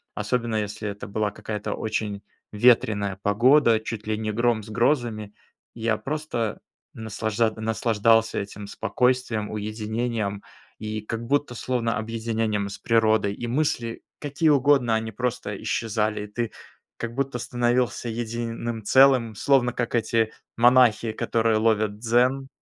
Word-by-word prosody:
особенно, 120 -2 -1
если 105 0 -3
это 100 +1 -7
была 105 0 -1
какая-то 105 -1 -5
очень 105 -2 -3 0.3
ветреная 105 -3 +3
погода, 115 +2 +4
чуть 110 -1 -6
ли 110 -1 0
не 110 -1 -2
гром 115 0 +1
с 105 - -12
грозами. 115 -3 0 0.4
Я 115 -1 0
просто 140 -6 -3 0.3
наслажад 110 +1 -1
наслаждался 115 0 +2
этим 100 +1 -7
спокойствием, 125 -3 0
уединением 110 0 -3 0.4
и 110 0 -4
как 115 +2 -5
будто 145 -1 0
словно 115 -2 -1
объединением 110 -2 -2
с 100 - -7
природой. 110 -3 +2
И 120 - -5
мысли, 120 -3 -1 0.2
какие 145 +2 0
угодно, 135 -5 +4
они 110 0 -2
просто 110 -3 -3
исчезали. 105 -2 -1
Ты 115 +2 -3 0.5
как 120 -1 -5
будто 135 0 -2
становился 120 0 0
единым 115 0 -4
целым, 130 -2 +5
словно 125 +1 +2
как 125 -1 -3
эти 115 -1 +1 0.3
монахи, 120 -2 +5
которые 115 0 +1
ловят 110 -2 +1
дзен, 125 +4 +2
115 Hz, 125 wpm, -25 LUFS, 110-120 Hz, 0.5 s, целым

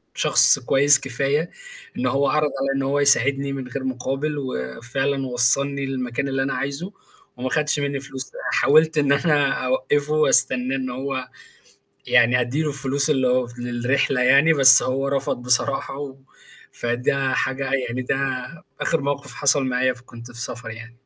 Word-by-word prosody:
شخص - - +4
كويس 140 0 +4
كفاية 140 +5 -2 0.5
إن 125 - -2
هو 140 +2 +1
عرض 150 +2 +1
عليَّ 135 0 -1
إن 135 - -1
هو 140 +2 0
يساعدني 140 0 +2
من 130 -2 -6
غير 130 +1 -6
مقابل، 135 +4 -3
وفعلًا 135 - -3
وصّلني 135 +3 +1
للمكان 130 0 -3
اللي 135 0 -1
أنا 135 - -2
عايزه 140 +7 -4 0.5
وما 130 +1 -3
خدش 150 +1 0
مني 140 -1 -2
فلوس، 135 -1 -8 0.2
حاولت 155 +3 +3
إن 145 -2 +2
أنا 145 -1 +2 0.2
أوقّفه 145 +4 +1
أستناه 130 +1 +2
إن 130 -1 -4
هو 130 +1 -5 0.8
يعني 120 +1 +4
أدّيله 145 +6 -1
الفلوس 140 +1 -1
اللي 130 -4 +2
هو 125 0 +1
للرحلة 125 +2 -1
يعني 140 +6 +5
بس 130 -3 +7
هو 135 +2 -1
رفض 135 -3 -2
بصراحة، 125 +2 0
و 135 -2 -7 0.5
فده 125 +3 -1
حاجة 135 +1 -2 0.2
يعني 125 +2 -3
ده 125 - -1 0.7
آخر 165 -3 0
موقف 140 -1 -4
حصل 140 +3 +2
معايا 130 0 0
فكنت 120 -1 -13
في 120 0 -8
سفر 120 0 -6
يعني. 115 +2 -10
135 Hz, 155 wpm, -22 LUFS, 125-140 Hz, 0.8 s, بس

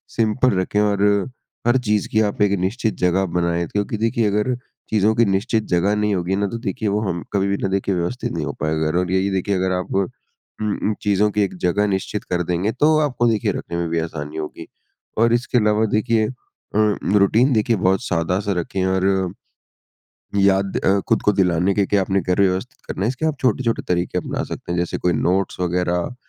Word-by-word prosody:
Simple 115 -1 +2
रखें 95 +2 0
और 100 -1 +1 0.6
हर 120 +2 +4
चीज़ 105 -1 +2
की 110 - +2
आप 105 -1 -1
एक 105 -1 +4
निश्चित 110 +4 -1
जगह 90 +2 +2
बनाएँ, 85 -1 -1
क्योंकि 105 +2 -2
देखिए 115 0 +1
अगर 105 +5 0 0.3
चीज़ों 110 0 +3
की 115 - +4
निश्चित 105 +3 0
जगह 90 +4 +2
नहीं 105 0 +1
होगी 90 +1 -1
ना, 100 +1 0
तो 115 - -4
देखिए 115 -2 -2
वो 100 +1 +1
हम 85 -1 -3
कभी 100 -1 +1
भी 100 0 0
ना - - +2
देखिए 95 0 0
व्यवस्थित 90 +9 -2
नहीं 80 -3 -2
हो 70 - -4
पाएगा। 80 +1 0
और 90 0 -1
यही 95 +1 +1
देखिए 95 +1 0
अगर 95 0 0
आप 90 - -6
उ 100 0 +2 0.6
उ, 105 0 -1
चीज़ों 105 0 +2
की 105 - 0
एक 100 - -2
जगह 100 +4 +2
निश्चित 95 +1 -2
कर 90 -1 -1
देंगे, 90 +5 -1
तो 155 +5 +3
आपको 130 -5 +1
देखिए 110 -3 +1
रखने 85 - -5
में 85 -1 -2
भी 85 0 0
आसानी 80 -2 -5
होगी। 75 -1 -6 0.5
और 115 +1 +4
इसके 120 +1 +1
अलावा 105 -1 +3
देखिए 110 0 +2
अ, 125 -3 -10 0.4
रूटीन 115 +7 +4
देखिए 115 +1 +2
बहुत 95 +3 +1
सादा-सा 90 +1 -1
रखें 95 +2 -2
और 95 0 +1 1.4
याद 100 0 +2
अ, 100 +1 +2
खुद 115 - +2
को 105 - +4
दिलाने 90 -1 +2
के, 100 0 +2
के 100 - +1
आपने 95 0 +1
घर 90 +3 +1
व्यवस्थित 95 -1 0
करना - - -5
है, - - +2
इसके 130 +5 -3
आप 155 -3 -1
छोटे-छोटे 120 -1 +1
तरीके 90 0 0
अपना - - -3
सकते - - -6
हैं, 85 - -1
जैसे 85 - -2
कोई 90 - +1
नोट्स 90 +5 0
वगैरह 90 +3 -1
100 Hz, 205 wpm, -21 LUFS, 90-110 Hz, 1.4 s, हर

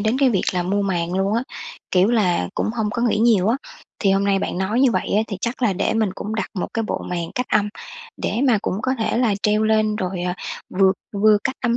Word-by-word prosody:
đến 220 +5 +1
cái 270 -3 +4
việc 195 - +1
là 180 -1 0
mua 200 +3 0
màn 175 -3 -1
luôn 195 +2 +1
á, 235 - +1 0.5
kiểu 185 +2 +4
là, 180 - +2
cũng - - -1
hông 215 -2 0
có 235 - -2
nghĩ 230 -3 +2
nhiều 220 -4 +4
á. 240 - +3 0.4
Thì 195 - +2
hôm 195 +1 +2
nay 200 -1 +2
bạn 185 - -3
nói 210 +6 0
như 270 - +5
vậy 185 - -1
á, 215 - +4
thì 200 - -4
chắc 245 +3 -3
là 220 - +3
để 195 +3 0
mình 220 -3 +1
cũng 210 +3 -5
đặt 220 - -3
một 185 - -2
cái 225 - 0
bộ - - -2
màn 170 -2 -3
cách 250 0 -1
âm 210 0 +2 0.5
để 225 - -1
mà 235 -5 +4
cũng - - -1
có 260 - +1
thể 225 +1 0
là 230 -5 +2
treo 210 +1 +2
lên 215 -1 +2
rồi, 185 -3 -3
ờ, 180 0 -1 0.5
vừa 190 -1 +6 0.2
vừa 210 +1 +4
cách 260 - -1
âm 240 -2 +1
210 Hz, 260 wpm, -21 LUFS, 190-225 Hz, 0.5 s, vừa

